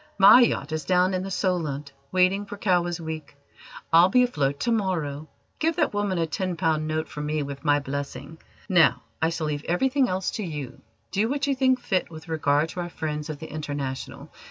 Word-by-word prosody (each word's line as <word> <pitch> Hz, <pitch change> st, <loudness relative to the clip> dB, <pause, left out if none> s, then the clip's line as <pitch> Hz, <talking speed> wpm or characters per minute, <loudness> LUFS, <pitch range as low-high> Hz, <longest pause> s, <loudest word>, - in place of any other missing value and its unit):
My 200 Hz, +6 st, +9 dB
yacht 155 Hz, -, +1 dB
is 155 Hz, 0 st, -2 dB
down 185 Hz, +1 st, +2 dB
in 185 Hz, -, 0 dB
the 195 Hz, -, -5 dB
Solent 160 Hz, -7 st, -1 dB, 0.2 s
waiting 185 Hz, +2 st, +2 dB
for 205 Hz, -, -7 dB
Cowes 175 Hz, -3 st, +1 dB
Week. 160 Hz, -3 st, -6 dB, 0.6 s
I'll 170 Hz, +3 st, +7 dB
be 250 Hz, +5 st, +5 dB
afloat 145 Hz, -, 0 dB
to 240 Hz, -, +1 dB
morrow. 160 Hz, -9 st, -1 dB, 0.3 s
Give 325 Hz, +1 st, +1 dB
that -, -, +1 dB
woman 205 Hz, -2 st, 0 dB
a 165 Hz, -, +1 dB
ten 180 Hz, +3 st, -3 dB
pound 160 Hz, -2 st, +1 dB
note 155 Hz, 0 st, -2 dB
from 150 Hz, 0 st, -5 dB
me 150 Hz, 0 st, -1 dB
with 140 Hz, 0 st, -7 dB
my 145 Hz, -2 st, +4 dB
blessing. 140 Hz, +2 st, -6 dB, 0.3 s
Now, 175 Hz, -5 st, +4 dB, 0.2 s
I 160 Hz, -, +3 dB
shall 165 Hz, -1 st, -3 dB
leave 150 Hz, -1 st, -3 dB
everything 260 Hz, +9 st, +2 dB
else 185 Hz, +1 st, -1 dB
to 215 Hz, -, -4 dB
you. 150 Hz, -7 st, -6 dB, 0.3 s
Do 210 Hz, +4 st, +1 dB
what 285 Hz, +1 st, 0 dB
you 280 Hz, -, +1 dB
think 260 Hz, -1 st, +2 dB
fit 185 Hz, -7 st, -1 dB
with 160 Hz, 0 st, -11 dB
regard 155 Hz, -1 st, +1 dB
to 180 Hz, -, -7 dB
our 175 Hz, 0 st, -3 dB
friends 150 Hz, -2 st, -4 dB
of 155 Hz, -, -4 dB
the 160 Hz, +2 st, -9 dB
International. 145 Hz, -3 st, -5 dB
165 Hz, 205 wpm, -25 LUFS, 150-190 Hz, 0.6 s, My